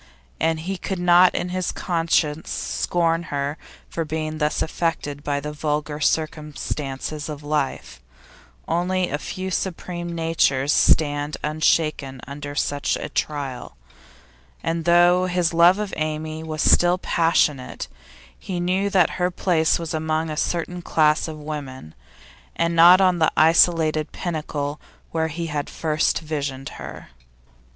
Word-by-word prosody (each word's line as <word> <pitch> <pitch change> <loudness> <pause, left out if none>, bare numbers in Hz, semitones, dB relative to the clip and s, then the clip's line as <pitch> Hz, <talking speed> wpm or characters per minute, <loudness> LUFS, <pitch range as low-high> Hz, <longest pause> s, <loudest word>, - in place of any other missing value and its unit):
And 160 0 +1
he 190 +3 -4
could 190 +1 -4
not 175 +1 +5
in 175 - -2
his 185 0 -2
conscience 165 -3 0
scorn 165 -1 0
her 140 +1 -2 0.3
for 165 - -3
being 155 0 -4
thus 150 0 +1
affected 155 -3 -3
by 145 -1 -1
the 150 +1 -6
vulgar 150 0 -2
circumstances 150 -2 -2
of 150 -1 -7
life; 145 - -3 0.7
only 180 +1 0
a 145 - -1
few 190 +2 -5
supreme 175 -1 -3
natures 155 -4 +1
stand 145 -1 +2
unshaken 155 -3 0
under 145 +1 -7
such 145 0 0
a - - -6
trial, 135 - -4 0.9
and 165 0 -2
though 175 +1 +5
his 175 -2 0
love 170 +3 +6
of 210 -2 -4
Amy 155 0 -3
was 155 -1 -3
still 175 +1 +5
passionate, 165 -7 0 0.5
he 185 -3 -4
knew 185 +3 0
that 185 -4 +3
her 180 - +3
place 170 -3 +1
was 165 -1 -5
among 160 0 -1
a - - -3
certain 175 +3 -2
class 155 -2 +2
of 155 -1 -6
women, 140 - -7 0.6
and 170 0 0
not 175 +3 +8
on 185 -2 +3
the 160 - +3
isolated 160 -1 +4
pinnacle 150 -4 -4 0.3
where 160 -1 0
he 165 +2 -4
had 150 -2 -3
at - - -12
first 155 0 0
visioned 140 -4 -4
her. - - -9
160 Hz, 140 wpm, -23 LUFS, 150-175 Hz, 0.9 s, not